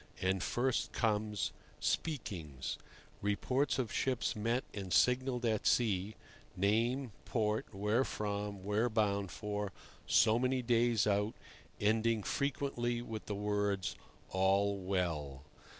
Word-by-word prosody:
And 95 0 +1
first 125 +5 0
comes 105 -6 0 0.3
"Speakings"—reports 105 - -2
of 125 -5 -2
ships 130 -2 0
met 115 +4 0
and 95 -3 -5
signalled 125 +4 +3
at 110 -2 +1
sea, 105 -3 +2 0.4
name, 115 +6 +1
port, 110 -2 0
where 105 +5 +1
from, 105 -4 -3
where 105 +4 +1
bound 100 -3 +1
for, 105 +2 -3 0.4
so 110 +1 +5
many 130 0 +1
days 120 -2 +3
out, 105 +1 +1 0.4
ending 110 +1 +2
frequently 130 -4 -1
with 110 -3 -6
the 105 - -2
words 100 -2 0 0.4
"All 100 +2 +3
well." 85 -8 -2
105 Hz, 110 wpm, -34 LUFS, 100-120 Hz, 0.4 s, so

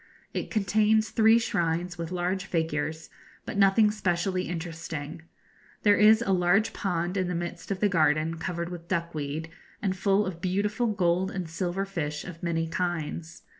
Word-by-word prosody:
It - - -3
contains 215 +1 +2
three 220 0 +5
shrines 175 -5 -1
with 170 -2 -5
large 180 +2 -1
figures, 160 -2 -2 0.3
but - - -5
nothing 205 +2 +5
specially 185 -2 -1
interesting. 165 -2 -5 0.6
There 205 -1 +6
is 215 +2 +6
a 195 - 0
large 185 +5 +3
pond 180 -1 -1
in 185 -2 +1
the 180 - -2
midst 170 0 -5
of 195 -2 -2
the 210 - +5
garden, 160 -2 +2
covered 170 0 -3
with 170 -1 -8
duckweed, 160 -3 -3 0.3
and 190 -2 -1
full 200 +2 +2
of 175 -3 -5
beautiful 205 +6 0
gold 185 -3 +1
and 185 -3 -4
silver 175 +4 -2
fish 150 -6 -4
of 175 -2 -9
many 165 -1 -1
kinds. 165 -2 -3
180 Hz, 160 wpm, -27 LUFS, 165-195 Hz, 0.6 s, There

